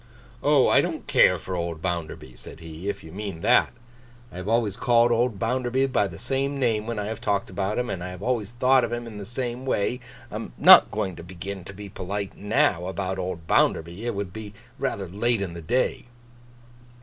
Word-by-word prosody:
'Oh! - - +4
I - - +5
don't - - -4
care - - +5
for 95 - -5
old 85 -2 -3
Bounderby,' 80 -7 -4
said - - -11
he, 80 +3 -6
'if - - -4
you 80 - -11
mean 95 -3 -6
that. - - +4 0.6
I - - -10
have 90 +1 -6
always 110 -3 +1
called 120 +1 +3
old 120 -2 +1
Bounderby 125 +4 0
by 100 - +2
the 85 -4 -10
same 135 +5 -2
name 110 -4 +1
when 115 -1 -3
I 105 - -2
have 110 +1 -5
talked 100 -4 -1
about 100 +2 -2
him, 125 0 0
and 90 -7 -4
I 90 - -5
have 90 +1 -9
always 115 -5 -1
thought 130 +2 +3
of - - -2
him 120 0 -3
in 110 -3 -8
the 100 - -7
same 120 +1 -3
way. 125 -1 0 0.3
I - - -7
am - - -7
not - - +9
going 100 -4 -3
to - - -9
begin 95 +2 -7
to 95 - -9
be 105 +1 -8
polite 100 +1 -5
now, 105 - +1
about 95 0 -3
old 90 -3 -4
Bounderby. 85 +5 +1
It 120 -2 -2
would 100 -2 -4
be 105 -1 -8 0.2
rather 100 -8 -2
late 110 +6 +1
in 95 -3 -3
the 85 - -7
day. 120 +9 0
100 Hz, 215 wpm, -25 LUFS, 90-120 Hz, 0.6 s, not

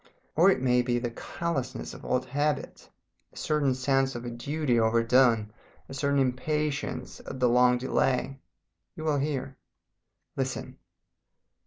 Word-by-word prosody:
Or 175 +5 +6
it 130 -9 +1
may 125 -1 +4
be 120 0 0
the 120 -1 -2
callousness 155 +2 -4
of - - -11
old 125 0 0
habit, 145 +1 -2 0.4
a - - -18
certain 145 -4 +1
sense 135 0 +1
of 120 0 -6
a 120 - -4
duty 130 +1 0
overdone, 115 -1 +3 0.3
a - - -9
certain 140 +1 0
impatience 140 +3 -1
at 130 - -8
the 125 - +4
long 125 +1 +4
delay. 130 +1 0 0.6
You 155 - -7
will 150 -3 +1
hear. 135 -2 -3 0.8
"Listen! - - -4
130 Hz, 140 wpm, -28 LUFS, 125-145 Hz, 0.8 s, Or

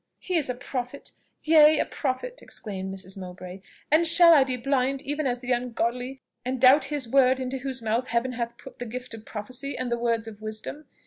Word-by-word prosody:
"He 365 - -4
is 310 -6 +1
a 250 - -1
prophet! 250 +2 -6 0.3
yea, 310 -1 +6
a - - +1
prophet!" 300 - -4
exclaimed 190 -3 -6
Mrs. 190 0 -7
Mowbray; 185 0 -9 0.3
"and 325 +2 +5
shall 335 +1 +8
I 285 -4 +7
be 260 -1 -3
blind 270 +1 0
even 290 0 -2
as 245 -1 -1
the 255 0 -4
ungodly, 245 +1 -2 0.2
and 255 +1 -3
doubt 265 +3 +6
his 280 -3 -3
word 260 +1 +4
into 260 +1 -3
whose 260 -2 -3
mouth 230 +4 0
Heaven 235 +2 0
hath 235 -1 -4
put 265 - -13
the 245 - -5
gift 250 +1 -7
of 225 -1 -10
prophecy 255 +6 -5
and 250 -1 -3
the 235 - 0
words 230 -1 0
of 215 -1 -10
wisdom? 220 +7 -6
255 Hz, 205 wpm, -26 LUFS, 235-275 Hz, 0.3 s, shall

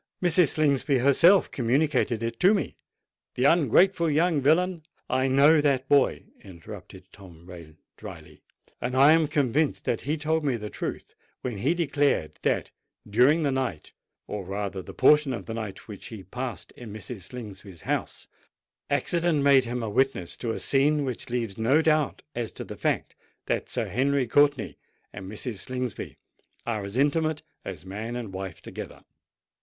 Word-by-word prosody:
Mrs. 175 -1 +4
Slingsby 140 -2 +2
herself 165 +9 +5
communicated 125 -2 +1
it 115 - -4
to 190 +4 +5
me. 195 - -3 0.6
The 125 - -1
ungrateful 170 - +4
young 155 0 +2
villain——" 170 +5 +2 0.3
"I 130 +1 +1
know 145 +4 +5
that 135 -3 +1
boy," 140 0 +3 0.2
interrupted 95 +1 -11
Tom 85 -4 -15
Rain 85 -4 -12 0.2
drily; - - -11 0.4
"and 125 +2 -2
I 140 +3 +7
am 160 -1 +3
convinced 145 0 0
that 115 - -1
he 150 +4 -2
told 160 +1 0
me 135 -4 +1
the 105 -1 -7
truth - - -5 0.3
when 120 -6 -4
he 145 - +1
declared 145 - 0
that, - - 0 0.4
during 130 +10 +4
the 140 - +1
night—or 120 -4 -5
rather 95 0 -4
the - - -10
portion 145 0 +4
of 105 -6 -6
the 115 - -5
night, 110 -4 -6
which 105 -4 -9
he 110 -4 -9
passed 125 +4 -6
in 120 -4 -11
Mrs. 110 +1 -7
Slingsby's 100 -7 -10
house, - - -3 0.6
accident 160 +2 +1
made 140 -2 +5
him 120 0 -3
a 110 - -2
witness 130 -8 0
to 120 - -4
a - - -3
scene 145 +1 +2
which 130 0 -5
leaves 115 -4 -3
no 130 +7 +3
doubt 155 -2 +1
as 120 -2 -3
to - - -6
the - - -8
fact - - -2 0.3
that - - -2
Sir - - -2
Henry 140 +1 +1
Courtenay 145 +3 +2 0.4
and 95 +1 -8
Mrs. 110 -1 -4
Slingsby 125 0 -5 0.5
are 110 -3 -2
as 100 +4 -6
intimate 155 +2 +1 0.2
as 90 -3 -7
man 110 +5 -5
and 115 -5 -6
wife 95 -3 -7
together." - - -9
130 Hz, 160 wpm, -26 LUFS, 105-150 Hz, 0.6 s, I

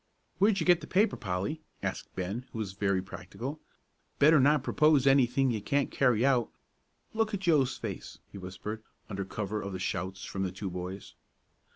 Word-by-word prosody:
"Where'd 200 0 +4
you 160 - -1
get 175 -1 +5
the - - -8
paper, 205 +4 +3
Polly?" 100 - -3 0.2
asked - - -4
Ben, 100 +8 -4
who - - -7
was 105 -4 -3
very 100 -1 0
practical. 135 +9 -7 0.6
"Better 155 +2 +6
not 145 +1 +4
propose 150 -2 +4
anything 135 -1 +4
you 110 -3 -2
can't 140 +6 0
carry 125 -3 +3
out. 125 -4 +3 0.6
Look 220 -1 0
at 195 - -5
Joe's 150 -8 +2
face," - - -6
he 100 - -8
whispered, 95 +4 -6 0.3
under 100 0 -2
cover 105 +2 -3
of 100 0 -5
the 95 - -4
shouts 95 +2 -3
from 95 - -4
the 95 -1 -1
two 95 0 -5
boys. 90 +2 -6
120 Hz, 180 wpm, -30 LUFS, 95-145 Hz, 0.6 s, Better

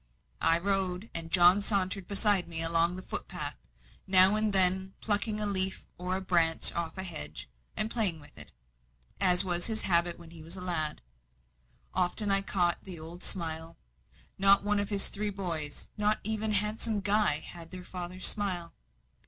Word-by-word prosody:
I 165 0 +3
rode, 190 +2 -2
and 165 -1 -5
John 180 +2 +5
sauntered 195 -2 -1
beside 200 -2 +1
me 165 -1 -1
along 165 +1 +2
the 185 - -9
footpath, - - -6 0.5
now 190 +1 +8
and 215 0 -1
then 190 0 +8
plucking 210 0 -3
a 210 - -4
leaf 190 -2 -2
or 185 +1 -5
branch 170 -3 +3
off 170 -1 -6
the 190 - -7
hedge, 75 - -6 0.3
and 215 +1 -1
playing 200 -9 0
with 145 - -19
it, - - -11 0.7
as 180 0 +4
was 175 -1 0
his 220 -1 -2
habit 170 -1 0
when 165 - -16
a 165 -1 -14 0.2
lad. 165 - -3 0.9
Often 185 +3 -2
I 195 0 +1
caught 180 -3 -2
the 180 -4 -9
old 165 +3 -12
smile 165 -3 -2 0.6
not 195 +1 +4
one 205 0 -2
of 205 - -4
his 200 -2 +1
three 210 +1 -4
boys, 170 -7 -5
not 210 0 -1
even 220 0 -1
handsome 210 +1 -1
Guy, 205 -5 +1
had 165 +1 -10
their 180 +1 -11
father's 180 0 -7
smile. 185 -5 -3
185 Hz, 160 wpm, -27 LUFS, 170-205 Hz, 0.9 s, now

